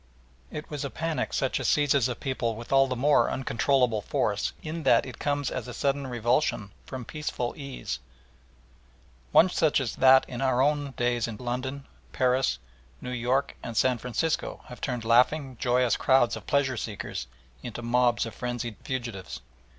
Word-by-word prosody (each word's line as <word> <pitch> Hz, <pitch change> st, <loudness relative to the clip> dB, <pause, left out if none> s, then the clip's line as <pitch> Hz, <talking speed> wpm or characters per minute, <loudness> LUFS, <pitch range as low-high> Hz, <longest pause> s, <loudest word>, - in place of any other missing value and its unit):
It 150 Hz, -, -7 dB
was 145 Hz, -1 st, -3 dB
a 140 Hz, -, -3 dB
panic 165 Hz, +3 st, -2 dB
such 135 Hz, -2 st, 0 dB
as -, -, -1 dB
seizes 140 Hz, -4 st, +3 dB
a 125 Hz, -, -2 dB
people 120 Hz, -4 st, -2 dB
with 115 Hz, +2 st, -9 dB
all 135 Hz, 0 st, +6 dB
the 130 Hz, -, -2 dB
more 145 Hz, +4 st, +3 dB
uncontrollable 125 Hz, -3 st, +1 dB
force -, -, 0 dB
in 160 Hz, +2 st, -4 dB
that -, -, +4 dB
it 130 Hz, -3 st, -9 dB
comes 145 Hz, -1 st, -1 dB
as -, -, -4 dB
a 125 Hz, -, -7 dB
sudden 140 Hz, -1 st, 0 dB
revulsion 120 Hz, -3 st, 0 dB, 0.2 s
from 130 Hz, -2 st, -6 dB
peaceful 140 Hz, -5 st, -3 dB
ease; 135 Hz, -, -5 dB, 1.3 s
one 165 Hz, -, +7 dB
such 160 Hz, -5 st, +2 dB
as 125 Hz, -5 st, -2 dB
those -, -, -12 dB
that 130 Hz, 0 st, +7 dB
in 125 Hz, 0 st, -6 dB
our 130 Hz, -2 st, +2 dB
own 145 Hz, 0 st, +1 dB
days 120 Hz, -1 st, +1 dB
in 110 Hz, -2 st, -6 dB
London, 130 Hz, +4 st, -4 dB, 0.3 s
Paris, 125 Hz, -, +2 dB, 0.4 s
New 125 Hz, -, -6 dB
York, 125 Hz, +2 st, 0 dB
and 115 Hz, -2 st, -6 dB
San 125 Hz, -1 st, +3 dB
Francisco 125 Hz, +7 st, -2 dB
have 125 Hz, -, -10 dB
turned 125 Hz, -4 st, -3 dB
laughing, 130 Hz, +4 st, +3 dB
joyous 125 Hz, -1 st, +2 dB
crowds 130 Hz, -3 st, +3 dB
of -, -, -10 dB
pleasure 135 Hz, -3 st, +1 dB
seekers 100 Hz, -, -5 dB, 0.3 s
into 120 Hz, 0 st, -6 dB
mobs 120 Hz, 0 st, +2 dB
of 115 Hz, -, -7 dB
frenzied 120 Hz, -3 st, -4 dB
fugitives. 115 Hz, -9 st, -5 dB
125 Hz, 170 wpm, -27 LUFS, 120-140 Hz, 1.3 s, one